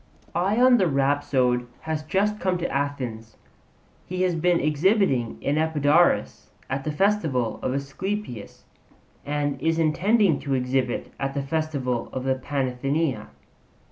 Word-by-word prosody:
Ion 220 +9 +4
the 185 - +3
rhapsode 135 -3 +1
has 160 -1 -3
just 200 +7 0
come 185 -1 0
to 175 - -2
Athens; 125 -6 -3 0.7
he 185 +1 -1
has 180 -1 +2
been 170 +1 +2
exhibiting 150 - +1
in 145 +2 +1
Epidaurus 160 +1 +2 0.2
at 135 0 -2
the 155 - -2
festival 150 - 0
of 130 - -1
Asclepius, 140 - -5 0.6
and 145 -2 -1
is 160 +1 +1
intending 175 +2 +3
to 140 -1 -1
exhibit 125 -1 -1
at 135 0 -2
the 140 - -1
festival 140 -5 -2
of 130 - -3
the 135 0 +2
Panathenaea. 135 +2 -2
145 Hz, 130 wpm, -25 LUFS, 130-175 Hz, 0.7 s, Ion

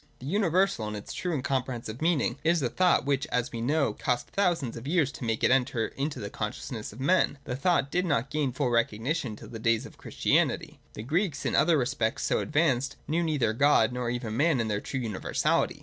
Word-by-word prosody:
The 125 - -11
universal 185 - +1
in 105 - -4
its 105 - -7
true 180 - -3
and 145 -6 -2
comprehensive 125 -4 -3
meaning 155 -6 +1
is 165 -1 +2
a 125 - +1
thought 180 0 +3
which, 140 +1 0
as 125 0 -1
we 115 - -5
know, 140 +4 +1
cost 125 -1 -2
thousands 175 -11 0
of 115 +3 -7
years 155 -3 +2
to 135 - -9
make 115 -1 -1
it - - +4
enter 125 -3 +1
into 145 +2 -4
the 100 0 -6
consciousness 105 +1 -5
of 110 - -13
men. 145 +1 +2
The 125 - -4
thought 140 -1 +1
did 180 +1 0
not 135 -4 0
gain 150 -3 0
its 130 - -10
full 130 -4 +1
recognition 115 +3 0
till 110 0 -12
the 115 -2 -7
days 115 0 +1
of - - -13
Christianity. - - 0 0.2
The 105 - -6
Greeks, 165 - -1
in - - 0
other 165 -1 +4
respects 120 -3 -1
so - - +1
advanced, 135 -4 +1
knew 160 +4 +1
neither 150 -9 +1
God 120 -2 +4
nor 125 -1 -2
even 120 -2 -3
man 145 +1 +3
in 115 -1 -1
their 105 -1 -1
true 135 - -4
universality. 110 -6 0
130 Hz, 220 wpm, -28 LUFS, 115-155 Hz, 0.2 s, it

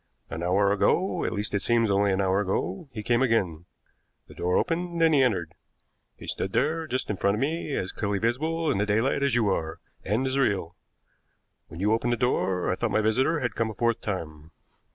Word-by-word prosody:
An 80 - -4
hour 95 +3 +2
ago, 170 - +1
at - - -1
least 105 -1 -3
it 100 - +2
seems 115 -3 +2
only 100 0 +3
an 95 +1 +1
hour 95 0 +2
ago, 95 - -2
he 110 - -6
came 120 +3 +2
again. 95 -10 +1 0.6
The - - -13
door 90 +1 0
opened, 170 0 -1
and 165 -1 +4
he 140 - +5
entered. 95 -11 0 0.6
He - - -11
stood 95 - -3
there 160 +4 0
just 130 -5 -2
in 100 - -3
front 100 +2 +2
of - - -3
me, 150 +1 -2
as 95 - -2
clearly 100 -1 -2
visible 155 +9 0
in 95 - 0
the 105 - 0
daylight 110 +7 +1
as 140 -3 +2
you 115 -4 +2
are, 80 -4 -2 0.2
and 110 +7 0
as 135 +1 0
real. 100 -10 0 0.9
When 80 - -10
you 105 +3 +2
opened 120 +2 +1
the - - -1
door, 95 -7 0
I - - 0
thought - - -1
my 110 - +2
visitor 130 +9 +1
had 120 - -1
come 115 -2 -1
a 110 - -7
fourth 115 +1 0
time." 80 -6 -5
110 Hz, 215 wpm, -26 LUFS, 95-130 Hz, 0.9 s, he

